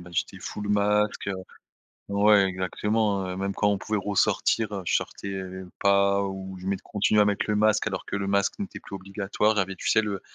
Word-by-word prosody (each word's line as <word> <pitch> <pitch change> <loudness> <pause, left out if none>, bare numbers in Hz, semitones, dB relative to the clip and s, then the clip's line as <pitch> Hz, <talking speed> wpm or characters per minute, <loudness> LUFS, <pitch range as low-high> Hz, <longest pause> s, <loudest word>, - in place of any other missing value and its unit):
bah, 90 0 -12
j'étais - - -2
full 105 -1 -5
masque, 105 0 +1
heu 100 - -1 0.8
ouais 100 0 +5
exactement, 100 +2 0
heu, 90 0 -4
même 100 0 -2
quand 105 - +2
on 100 - +1
pouvait 105 +2 -2
ressortir, 105 +2 +1
heu, 95 -2 -4
je - - 0
sortais, 100 - -3
heu, 95 -1 -5
v 90 - -13
pas 100 0 +3
ou 95 -1 -6
je 90 - -10
met 100 - +1
je - - -20
continuais 105 +1 +2
à - - +5
mettre 105 -1 0
le 105 - +1
masque, 105 +1 +3
alors 100 - -4
que 100 - -3
le 100 -1 -3
masque 100 - +1
n'était 200 - -6
plus 100 - -8
obligatoire. 100 +2 0
Il - - +2
y - - +5
avais 95 0 -4
tu - - -5
sais 110 - +4
le 100 -3 -3
100 Hz, 240 wpm, -26 LUFS, 95-105 Hz, 0.8 s, ouais